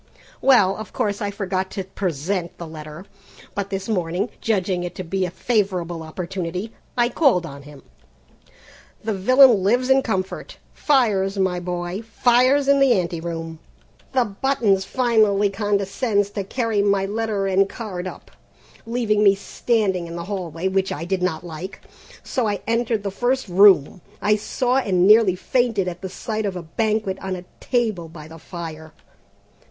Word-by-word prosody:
Well, 205 -8 +5
of 215 - -8
course 205 -1 -1
I 205 - -1
forgot 190 -2 -2
to 195 - -3
present 180 -1 -3
the 170 - -7
letter, 155 +2 -9 0.5
but 200 -1 -3
this 195 -1 -4
morning, 185 0 -1
judging 185 -4 0
it 175 0 -5
to 185 - -5
be 185 +2 -1
a - - -5
favourable 180 -4 -1
opportunity, 180 +4 -5 0.2
I 240 -1 +4
called 240 - +2
on 140 -3 -9
him. 145 -1 -14 1.2
"The 220 0 -1
villain 245 +2 +6
lives 245 +7 +2
in 265 0 +5
comfort; 190 -6 -3 0.2
fires, 210 -9 +2
my 185 -2 +1
boy! 175 +2 -4
fires 250 +5 +3
in 280 0 +5
the 270 -2 +5
ante 170 -1 -3
rooms! 165 -1 -5 0.5
The 255 -2 +3
Buttons 205 -3 +1
finally 215 -5 +2
condescends 205 +1 0
to 205 -1 -3
carry 225 -1 0
my 200 -1 +2
letter 210 -1 -2
and 195 0 +2
card 190 -6 -6
up, - - -10 0.6
leaving 225 -3 +1
me 200 -1 +6
standing 195 -3 -1
in 170 - -7
the 170 0 -5
hallway, 180 -3 -3
which 190 0 0
I 155 +3 -4
did 185 +1 -1
not 180 -2 -1
like, 175 +4 -7 0.4
so 250 -4 -1
I 205 -2 -2
entered 230 -1 0
the 200 - -2
first 245 +5 0
room 185 -3 +5 0.2
I 210 +1 +3
saw 250 +4 0
and 185 -8 +2
nearly 210 -2 +6
fainted 225 -1 0
at 175 -1 -5
the 190 - -5
sight 220 +2 -3
of 190 - -4
a 180 - -5
banquet 210 +2 -1
on 190 -1 -3
a 180 0 -9
table 220 -9 -1
by 155 -2 -11
the 165 +1 -12
fire. 160 -2 -8
195 Hz, 165 wpm, -22 LUFS, 180-220 Hz, 1.2 s, villain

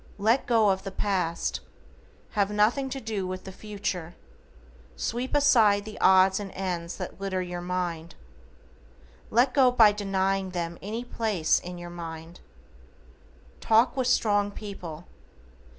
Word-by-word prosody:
LET 225 +6 +2
GO 225 -4 +4
OF 190 -1 +1
THE 195 - -4
PAST. 185 -4 -1 0.7
Have 205 -2 +1
nothing 215 +6 +1
to 270 +1 -4
do 215 -6 -3
with 185 0 -5
the 190 - -8
future. 185 -4 -5 0.8
Sweep 245 - -3
aside 225 -8 +4
the 215 - -9
odds 190 +1 +5
and 200 -2 -6
ends 180 -3 -4
that 185 0 -7
litter 190 -2 -2
your 175 -1 -5
mind. 175 -2 -3 1.1
Let 250 +3 +3
go 265 -3 +5
by 225 -4 +6
denying 195 -1 -1
them 170 0 -4
any 225 +5 -5
place 215 -9 +1
in 180 0 -8
your 175 0 -8
mind. 165 0 -8 1.2
TALK 225 +4 +3
WITH 260 -2 0
STRONG 205 -4 +2
PEOPLE. 180 -6 -8
195 Hz, 135 wpm, -27 LUFS, 180-220 Hz, 1.2 s, by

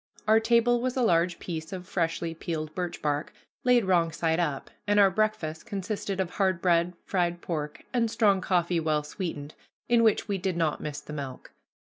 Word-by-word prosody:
Our 220 +1 +6
table 235 +1 +3
was 255 +1 -1
a 255 - +2
large 175 -4 +2
piece 160 -2 -6
of 185 -1 -6
freshly 165 -2 -1
peeled 155 -2 -4
birch 180 -2 -4
bark, 145 0 -1 0.3
laid 245 -4 +4
wrong 170 -3 +3
side 160 +2 0
up, 150 -6 -2 0.2
and 205 0 +4
our 195 -1 +6
breakfast 200 -6 -1
consisted 200 0 -3
of 185 -2 -1
hard 190 -3 +1
bread, 175 0 +2
fried 175 -2 0
pork, 150 -3 -4
and 235 -2 +2
strong 205 -4 +3
coffee 175 -2 +1
well 155 -2 0
sweetened, 150 -2 -5 0.3
in 240 -1 +4
which 225 -1 +3
we 200 -2 -1
did 185 -1 -1
not 160 -3 0
miss 150 -1 -5
the 150 - -9
milk. 135 -3 -7
175 Hz, 185 wpm, -28 LUFS, 160-205 Hz, 0.3 s, Our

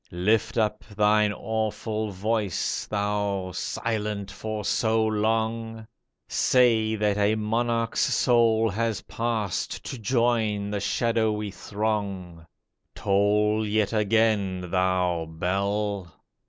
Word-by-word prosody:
Lift 105 +7 0
up 105 -1 0
thine 105 0 +2
awful 110 0 -2
voice, 105 -1 -1
Thou, 100 -2 -1
silent 105 0 -3
for 110 +1 -5
so 110 -1 +2
long! 110 +1 -1 0.4
Say 115 -4 +3
that 105 -1 +1
a 105 +1 +3
monarch's 115 +1 0
soul 115 -3 +3
has 115 0 -1
passed 115 -5 -3
To 130 - -6
join 110 -3 +1
the 105 - -1
shadowy 110 -1 0
throng. 100 -6 -3 0.5
Toll 105 +2 +2
yet 105 0 0
again, 105 -4 +1
thou 90 -3 +1
bell 100 +2 -2
105 Hz, 100 wpm, -26 LUFS, 100-110 Hz, 0.5 s, Say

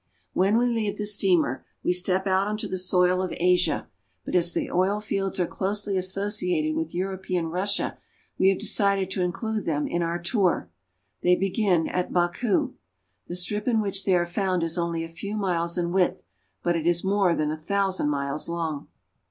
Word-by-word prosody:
When 195 +4 +3
we 240 - +3
leave 220 -4 -1
the 210 - -3
steamer 185 -10 +2 0.2
we 180 - +2
step 185 +1 +2
out 190 +1 +2
on 210 0 -2
the - - -3
soil 180 0 +3
of 185 - -2
Asia, 180 0 +2 0.4
but - - -5
as 175 -1 +3
the - - -2
oil 190 +3 +2
fields 195 -2 -2
are 180 - +3
closely 200 +2 -2
associated 185 -4 +1
with 160 0 -2
Euro 190 +1 -2
pean 180 -3 -2
Russia, 185 +5 -2 0.4
we 190 - +5
have 195 - +2
decided 200 -2 +1
to 190 - -1
include 215 +4 -2
them 150 -2 0
in 175 - -1
our 170 0 -1
tour. 175 - 0 0.5
They 180 0 +4
begin 190 -3 +1
at 180 0 -2
Baku. 180 +5 +1 0.5
The 175 - -5
strip 210 +5 -1
in 230 -3 +3
which 195 -2 0
they 190 - +3
are 175 -1 +2
found 185 0 -1
is 165 0 0
only 170 -2 -1
a - - -5
few 200 +6 -6
miles 170 -4 -1
in 170 -1 0
width, 185 - +1 0.4
but 175 0 +1
it 165 0 -1
is 175 0 +2
more 195 -3 +2
than 150 0 0
a 155 - -3
thousand 190 -1 0
miles 140 +1 -2
long. 165 -4 -3
180 Hz, 190 wpm, -25 LUFS, 170-200 Hz, 0.5 s, we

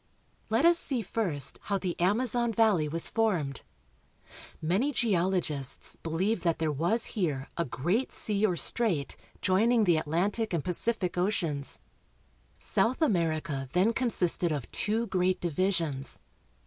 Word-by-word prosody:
Let 225 +7 +2
us 340 0 +6
see 255 -5 -1
first 155 - -2
how 200 - 0
the 180 -2 -3
Amazon 235 +5 +1
valley 210 -8 +3
was 165 +2 -1
formed. 180 - 0 1.0
Many 195 - +1
geologists 180 - -1
believe 185 +7 -1
that 170 -2 +1
there 160 -1 0
was 175 - +1
here 150 - -2
a 170 - -1
great 175 - -1
sea 210 -1 +1
or 190 -5 +3
strait 175 -7 +1 0.3
joining 220 +5 +3
the 175 -5 +3
Atlantic 185 +8 -1
and 165 -4 0
Pacific 185 0 0
oceans. 165 -7 -1 0.8
South 240 +3 0
America 160 - 0
then 190 +6 +3
consisted 185 -8 0
of 145 -6 -4
two 220 +3 +1
great 185 -2 0
divisions. 170 -5 -1
185 Hz, 130 wpm, -29 LUFS, 160-225 Hz, 1.0 s, us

